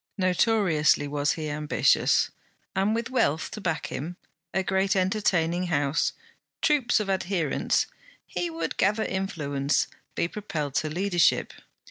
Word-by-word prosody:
Notoriously 180 -6 +3
was 145 0 0
he 155 -2 -4
ambitious, 150 0 +2 0.4
and 195 +3 +2
with 230 +2 -3
wealth 160 - +1
to 215 - -7
back 165 -4 -1
him, 170 +6 -5 0.3
a 190 - 0
great 190 +1 +1
entertaining 185 -3 +1
house, 145 -1 +1 0.5
troops 275 -7 +3
of 210 - -2
adherents, 185 -5 0 0.4
he 175 -1 -3
would 165 0 -4
gather 210 +3 +2
influence, 150 -8 -1 0.3
be - - +1
propelled 160 -8 -4
to 155 - 0
leadership. 175 +1 +2
175 Hz, 125 wpm, -26 LUFS, 155-195 Hz, 0.5 s, Notoriously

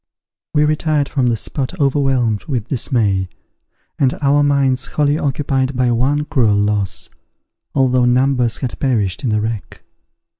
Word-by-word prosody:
We 150 0 +4
retired 150 -1 0
from 130 -3 0
the 115 -2 +1
spot 140 - -4
overwhelmed 135 -6 +1
with 125 -5 -3
dismay, 105 -7 0 0.7
and 135 -2 +1
our 145 0 +3
minds 140 -3 +1
wholly 145 0 0
occupied 135 -1 -1
by 125 -1 +2
one 140 +5 +1
cruel 125 -9 +2
loss, 100 -5 -1 0.6
although 130 -2 +3
numbers 125 -1 +2
had 130 -3 -5
perished 110 -6 0
in 125 - 0
the 105 -1 +1
wreck. 110 -1 -5
130 Hz, 140 wpm, -18 LUFS, 115-140 Hz, 0.7 s, We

